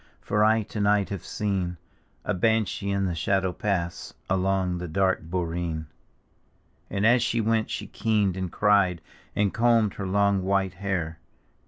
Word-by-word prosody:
For 105 +1 +1
I 110 +1 +4
to 105 - -7
night 105 -1 +2
have 100 -4 -5
seen 95 -4 -2 0.5
A 105 - 0
banshee 110 0 +1
in 100 0 0
the 90 - -1
shadow 95 +3 0
pass 85 -5 -3 0.2
Along 95 -1 +1
the 90 - -4
dark 95 +3 +1
borecn. 85 -2 -3 1.0
And 100 +1 0
as 120 +2 +5
she 115 0 0
went 110 0 +1
she - - -4
keened 105 -4 0
and 95 -2 -3
cried. 100 -4 +3 0.4
And 100 -2 +1
combed 115 -3 +3
her 100 - -5
long 100 0 +2
white 95 -1 0
hair. 90 -4 -3
95 Hz, 155 wpm, -26 LUFS, 90-105 Hz, 1.0 s, as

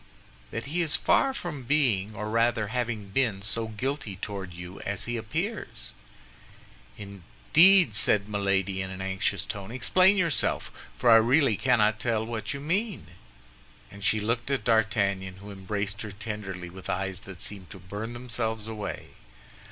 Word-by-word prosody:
"That 115 - -5
he 160 +6 -1
is 160 -2 +2
far 275 - +3
from 175 - -5
being, 115 -7 +1
or 105 +1 -4
rather 115 -2 +2
having 115 -4 -2
been, 105 -4 0
so 115 +2 0
guilty 110 -1 -3
toward 95 -1 -6
you 90 +2 -9
as 100 -1 -2
he 120 - -2
appears." 165 - -4 1.1
"Indeed!" 105 - +4
said 105 -1 +3
Milady, 100 -2 0
in 95 - -4
an 95 0 -7
anxious 95 0 -1
tone; 100 -1 -6
"explain 185 - +4
yourself, 170 -6 +1 0.3
for 120 - +4
I 115 - +10
really 125 +2 +4
cannot 110 -3 +3
tell 110 -2 0
what 115 -1 -3
you 140 - -4
mean." 170 - -2 0.8
And 100 0 -11
she 110 +2 +2
looked 115 +4 -1
at 135 -1 0
D'Artagnan, 100 -4 +1
who 100 +2 -10
embraced 100 +1 -3
her 105 - -6
tenderly, 100 -4 -6
with 95 +1 -10
eyes 95 0 -2
which 95 -3 -10
seemed 95 -3 -5
to - - -10
burn 105 +5 -6
themselves 115 -2 -3
away. 110 -2 -5
110 Hz, 155 wpm, -27 LUFS, 100-125 Hz, 1.1 s, I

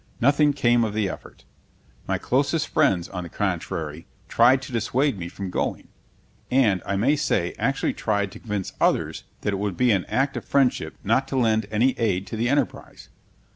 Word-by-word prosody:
Nothing 145 +4 +4
came 120 -4 +2
of 105 -2 -2
the 105 -2 +1
effort. - - -9 0.6
My - - 0
closest 145 +5 0
friends, 90 -2 +2
on 90 -2 -5
the 85 - -8
contrary, 80 0 -3 0.2
tried 125 +3 +5
to - - -8
dissuade 120 +1 0
me 85 - -4
from 95 0 -6
going; - - -3 0.6
and, 115 -8 +3
I 100 - 0
may 125 +10 +3
say, 105 - 0
actually 135 0 0
tried 100 -2 -1
to - - -11
convince 105 -4 -4
others - - +1 0.2
that 105 - -1
it 95 - -2
would 100 -3 -2
be 125 -1 +3
an 95 -4 +1
act 135 +2 0
of - - -5
friendship 125 - +1
not 115 +6 +1
to 135 - -3
lend 110 -4 +2
any 115 +5 +3
aid 95 -4 0
to 105 - -6
the 115 +2 0
enterprise. 145 +2 -2
110 Hz, 185 wpm, -24 LUFS, 100-130 Hz, 0.6 s, tried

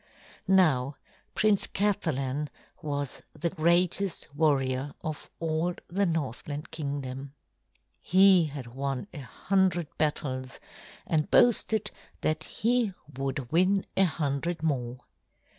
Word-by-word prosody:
Now 150 -8 +3 0.4
Prince 210 -1 +3
Kathalan 150 -8 -1 0.3
was 145 -3 -3 0.2
the 170 +2 0
greatest 175 0 +1
warrior 140 -3 +1
of 155 -2 -5
all 165 +2 0
the 195 +2 +1
Northland 150 -2 -3
Kingdom. 140 -2 -5 0.7
He 185 -1 +6
had 140 -4 -6
won 135 +2 -2
a 155 - -7
hundred 175 +3 0
battles 130 -4 -2 0.5
and 155 -2 0
boasted 220 -3 +3 0.3
that 155 0 0
he 230 -4 0 0.2
would 135 -1 -3
win 185 +4 +3
a 195 - +5
hundred 155 +1 -2
more. 125 -5 -1
155 Hz, 105 wpm, -28 LUFS, 140-180 Hz, 0.7 s, He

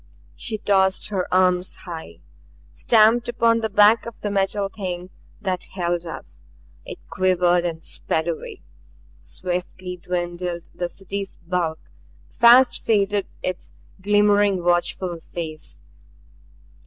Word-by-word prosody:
She 215 - -1
tossed 190 -2 +2
her 190 -3 -2
arms 185 0 +2
high; 165 -3 -8 0.5
stamped 230 +1 +4
upon 230 -1 +2
the 220 -1 -2
back 210 +3 +5
of 235 - -7
the 205 - -2
Metal 195 0 0
Thing 185 -2 -6 0.3
that 185 -4 -3
held 175 -2 -1
us. 160 - -8 0.4
It - - -8
quivered 180 -1 +2
and 165 -2 -4
sped 160 +1 -2
away. 165 -2 -5 0.6
Swiftly 180 0 -5
dwindled 175 0 -4
the 175 -1 -3
City's 195 +1 -6
bulk; 170 -2 -2 0.5
fast 240 +2 +6
faded 205 -2 +1 0.2
its 185 -1 -4 0.3
glimmering 205 -2 +3
watchful 175 0 0
face. 155 - -7
185 Hz, 115 wpm, -22 LUFS, 175-205 Hz, 0.6 s, fast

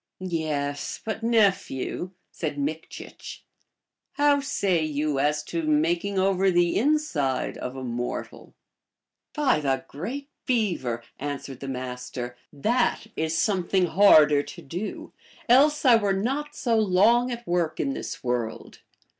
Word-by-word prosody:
" - - -62
Yes; 155 -5 -3
but, 220 0 -3
nephew," 200 - +1 0.2
said 150 -3 -4
Mikchich, 155 +3 -6 0.3
" - - -60 0.3
how 290 0 +3
say 200 - 0
you 150 -2 -1
as 150 +2 +1
to 165 +2 -3
making 165 +6 +1
over 190 0 +3
the 175 -1 +2
inside 225 - 0
of 125 - -5
a 130 - -6
mortal? 120 0 -5 0.2
" - - -63
" - - -61
By 290 - +2
the 135 -3 -1
great 265 - -6 0.2
Beaver! 170 - 0
" - - -46
answered 140 -2 -5
the 135 - -7
Master, 125 -1 -5
" - - -62 0.2
that 240 -1 +2
is 160 0 -1
something 190 -1 +1
harder 155 -5 +6
to - - -10
do, 180 +9 -6 0.3
else 290 +5 +4
I 245 -3 +8
were 205 -3 +1
not 275 +9 -2
so 230 -3 +1
long 220 +5 +4
at 240 -1 -5
work 175 -3 -1
in 140 - 0
this - - -6
world. 120 -2 -3
175 Hz, 145 wpm, -25 LUFS, 145-225 Hz, 0.3 s, I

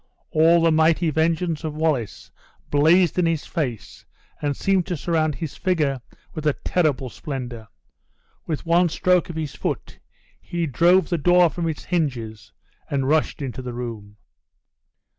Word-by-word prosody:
All 165 +2 +4
the 165 - +4
mighty 160 +1 +3
vengeance 165 +1 0
of 155 -2 -4
Wallace 150 -9 -2 0.4
blazed 165 +4 +4
in 175 - +3
his 165 -2 -1
face 130 - -4 0.4
and 145 -2 -1
seemed 195 -3 +1
to 180 -3 -2
surround 155 -1 0
his 160 -5 -6
figure 150 -8 0 0.3
with 155 -2 -3
a 150 - +3
terrible 150 -7 +1
splendor. 125 -6 -6 0.8
With 155 -1 -3
one 170 +1 +3
stroke 180 +2 +2
of 170 - -6
his 155 -3 -4
foot - - -4 0.4
he 170 -1 -3
drove 175 +6 +3
the 175 -3 0
door 175 +1 +4
from 170 -2 -2
its 155 - -5
hinges, 120 - -3 0.4
and 135 -2 -1
rushed 155 0 +1
into 130 -1 -5
the 125 -1 -6
room. 110 -4 -7
155 Hz, 150 wpm, -23 LUFS, 135-170 Hz, 0.8 s, All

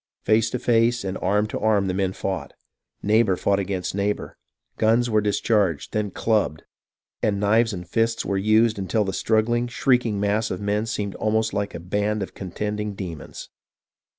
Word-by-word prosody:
Face 110 +2 +3
to 125 - -2
face 120 0 +2
and 95 -1 -3
arm 105 +3 +1
to 110 - -4
arm 105 -2 +2
the 95 - -1
men 95 0 0
fought. 95 -6 -4 0.5
Neighbour 105 -2 +3
fought 100 +2 +1
against 95 -2 -3
neighbour. 100 +1 -2 0.4
Guns 115 +2 +3
were 110 -1 +3
dis 105 -1 0
charged, 100 - +1
then 105 -1 0
clubbed; 105 -6 0 0.6
and 100 -2 +1
knives 110 +3 +3
and 90 -3 -6
fists 115 +4 0
were 100 - -1
used 110 +2 +3
until 105 +3 0
the 95 -1 -3
struggling, 115 +4 +1
shrieking 120 -4 +1
mass 105 +2 +1
of 95 - -3
men 105 +2 -1
seemed 100 -3 -3
almost 110 0 0
like 100 -2 -2
a - - -5
band 105 +4 -1
of - - -8
contending 105 +2 -4
demons. 90 -5 -7
105 Hz, 175 wpm, -24 LUFS, 95-110 Hz, 0.6 s, Face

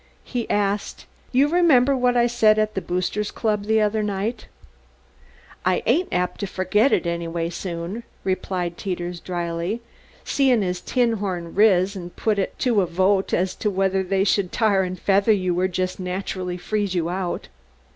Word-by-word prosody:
He 245 -3 -4
asked: 205 0 -1 0.3
"You 270 +3 +4
remember 295 -6 +4
what 250 -1 +2
I 240 - +4
said 225 -3 +4
at 215 0 +1
the 190 - -2
Boosters' 185 +4 -2
Club 210 -3 -1
the 220 +1 +3
other 215 +1 +1
night?" 210 +3 -3 1.2
"I 185 0 +1
ain't 320 +11 +2
apt 180 0 -1
to 200 - -2
fergit 205 +7 +2
it - - +2
anyways 170 0 -2
soon," 175 +4 -5 0.2
replied 185 -2 -2
Teeters, 175 -2 -4
dryly, 175 +4 -3 0.4
"seein' 260 -6 +2
as 180 -1 -2
'Tinhorn' 205 -9 -1
riz 200 -2 +4
and 175 -2 -8
put 215 -2 0
it 195 - -2
to 235 -6 +2
a 180 - 0
vote 190 +3 +1
as 185 +1 +1
to 210 - 0
whether 190 -1 +1
they 190 +1 +1
should 195 -2 +1
tar 210 -4 +2
and 185 -1 -3
feather 200 +4 +3
you 185 -4 +1
or 185 - +2
jest 185 0 -2
naturally 180 0 -3
freeze 200 +1 -2
you 170 -2 0
out." 180 0 -3
195 Hz, 165 wpm, -23 LUFS, 180-215 Hz, 1.2 s, You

